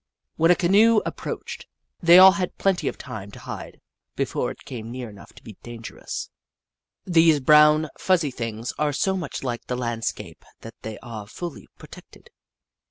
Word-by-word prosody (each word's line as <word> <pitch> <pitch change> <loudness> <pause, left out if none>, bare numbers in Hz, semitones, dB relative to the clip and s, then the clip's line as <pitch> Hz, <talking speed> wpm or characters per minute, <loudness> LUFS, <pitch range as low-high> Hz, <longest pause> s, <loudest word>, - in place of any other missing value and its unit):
When 165 +1 +3
a 180 - +7
canoe 210 +6 +4
ap - - -4
proached, - - -6 0.4
they 170 0 +7
all 190 +1 +10
had 185 -2 -3
plenty 195 -2 0
of - - -3
time 110 -6 -8
to - - -11
hide - - -8 0.4
before - - -1
it - - -11
came 115 -3 -7
near 120 -2 -7
enough 100 - -14
to - - -17
be 110 - -12
dangerous. 120 -1 -7 0.7
These 165 -4 +4
brown, 150 +2 +5
fuzzy 170 -7 +1
things 115 -1 -5
are 150 -1 +1
so 190 +7 0
much 175 -8 -5
like 120 -3 -4
the 125 - -2
landscape 120 -2 -4 0.2
that 115 - -10
they 110 -1 -7
are 110 -3 -8
fully 170 +8 -8
protected. - - -15
145 Hz, 165 wpm, -24 LUFS, 115-175 Hz, 0.7 s, all